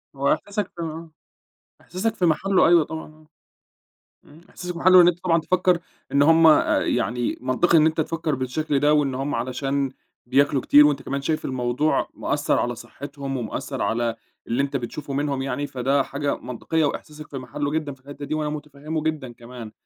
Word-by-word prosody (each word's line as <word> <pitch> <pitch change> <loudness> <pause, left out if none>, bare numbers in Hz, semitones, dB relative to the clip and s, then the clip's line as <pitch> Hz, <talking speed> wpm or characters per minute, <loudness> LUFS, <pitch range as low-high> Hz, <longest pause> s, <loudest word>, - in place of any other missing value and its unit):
هو 140 +1 +2
إحساسك 205 0 -4
آه، 165 0 -6 0.7
إحساسك 215 +5 -3
في 180 - +1
محله 185 +5 +3
أيوَه 170 -2 +5
طبعًا 160 0 -7
آه. 155 0 -19 1.0
إمم 150 +3 -17
إحساسك 180 -1 -6
في 170 - -8
محله 185 +1 +7
إن 175 - +7
أنت 175 0 0
طبعًا 165 -2 +3
تفكّر 180 +1 +2 0.3
إن 140 - +4
هُم 165 +2 +6
آآ 155 -2 +5
يعني 120 +1 -1
منطقي 130 +7 +3
إن 155 - +5
أنت 160 0 +1
تفكّر 155 -1 -1
بالشكل 135 +3 -1
ده، 150 +1 +4
وإن 140 -3 +1
هُم 135 +2 -2
علشان 135 +3 -1 0.4
بياكلوا 135 +1 +2
كتير 150 0 +7
وأنت 145 -2 0
كمان 140 +1 -3
شايف 155 +2 -1
الموضوع 130 +3 0
مأثر - - 0
على 120 0 -1
صحتهم، 135 +3 -7
ومأثر 115 -4 -4
على 115 +2 0 0.3
اللي 120 +4 0
أنت 140 0 -2
بتشوفه 140 +3 -5
منهم 140 -1 -1
يعني، 135 +2 -2
فده 135 +1 +1
حاجة 140 +1 -2
منطقيّة 155 +6 -2
وإحساسك 150 +1 -5
في 135 - -6
محله 140 +3 -4
جدًا 155 -2 -2
في 135 - -16
الحتّة 145 +2 -9
دي 150 +2 -3
وأنا 150 -1 -1
متفهمه 150 +1 -5
جدًا 150 -6 -3
كمان. 120 -2 -10
145 Hz, 180 wpm, -23 LUFS, 135-160 Hz, 1.0 s, محله